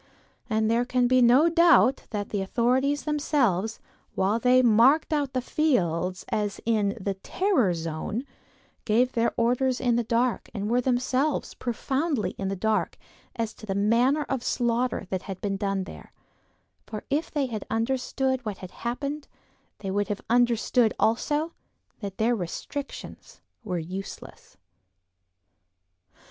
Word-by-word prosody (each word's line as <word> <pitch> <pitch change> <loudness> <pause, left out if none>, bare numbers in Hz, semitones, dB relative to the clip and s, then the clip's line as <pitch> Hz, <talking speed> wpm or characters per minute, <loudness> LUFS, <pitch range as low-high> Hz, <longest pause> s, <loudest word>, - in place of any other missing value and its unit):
And 220 -1 +1
there 235 +1 +3
can 250 0 +1
be 255 +1 +4
no 250 +7 +6
doubt 330 - +4
that 205 -2 -4
the 205 - -2
authorities 255 +8 +1
themselves, 250 - 0 0.4
while 200 +4 +1
they 255 +2 +4
marked 250 +8 +4
out 285 -3 0
the 255 -1 -1
fields 185 - 0
as 205 -1 -1
in 215 -2 +1
the 200 0 -2
"terror 245 - +1
zone," 165 +8 -4 0.6
gave 240 +4 +2
their 235 -1 +1
orders 250 +2 +1
in 240 -2 +2
the 240 - +1
dark 235 +2 0
and 205 +1 -2
were 245 +1 +3
themselves 255 +3 0
profoundly 265 +2 -1
in 195 - -5
the 195 - -2
dark 215 +3 0 0.4
as 225 -2 -2
to 215 - -13
the 195 - -1
manner 235 +9 +3
of 270 - -1
the - - -12
slaughter 240 -2 0
that 190 -1 -1
had 190 -1 -7
been 200 -1 -2
done 195 -1 -1
there; - - -11 0.8
for 215 -1 -6
if 300 +4 0
they 290 -3 0
had 220 -5 -4
understood 260 +2 -1
what 210 -4 -4
had 185 - -9
happened, 280 +5 -4 0.5
they 195 - -5
would 205 0 0
have 205 -1 -3
understood 240 -1 +3
also 295 +8 +1 0.5
that 200 -3 -6
their 235 +2 +2
restrictions 230 +9 -7 0.2
were 185 -5 -2
useless. 185 +4 -8
235 Hz, 145 wpm, -26 LUFS, 205-260 Hz, 0.8 s, no